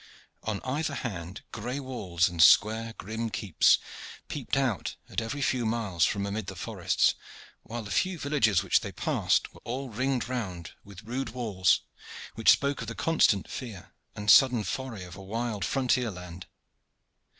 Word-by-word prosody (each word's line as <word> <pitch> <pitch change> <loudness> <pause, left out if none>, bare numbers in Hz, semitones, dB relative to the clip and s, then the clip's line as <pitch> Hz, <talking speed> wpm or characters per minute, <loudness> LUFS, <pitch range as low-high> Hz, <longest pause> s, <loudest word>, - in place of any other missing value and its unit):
On 105 -2 -3
either 145 +3 -2
hand 95 -6 -5
gray 120 +5 -4
walls 100 -10 0
and 85 -2 -1
square 110 +6 +5
grim 110 +3 -4
keeps 100 -6 +3 0.5
peeped 140 -1 -2
out 125 - 0
at - - -2
every 140 +6 -3
few 130 -1 +1
miles 110 -7 +1
from 100 -1 -1
amid 100 0 -3
the - - -6
forests - - +1 0.5
while 115 +2 -6
the 100 - -8
few 185 - +1
villages 130 - +2
which 95 - +3
they - - -6
passed - - 0
were - - -16
all 130 +3 -4
ringed 125 +2 -1
round 95 -10 -4
with 100 -2 -12
rude 125 +2 -4
walls, 105 -7 +2 0.5
which 115 - +2
spoke 140 0 +4
of - - -5
the - - -5
constant 155 - +2
fear 110 -9 -8 0.2
and 105 -1 +3
sudden 125 -3 +6
foray 125 -4 -4
of 90 0 -10
a 100 - -10
wild 110 +1 -3
frontier 125 -3 +1
land. 90 -2 -9
115 Hz, 160 wpm, -28 LUFS, 100-130 Hz, 0.5 s, sudden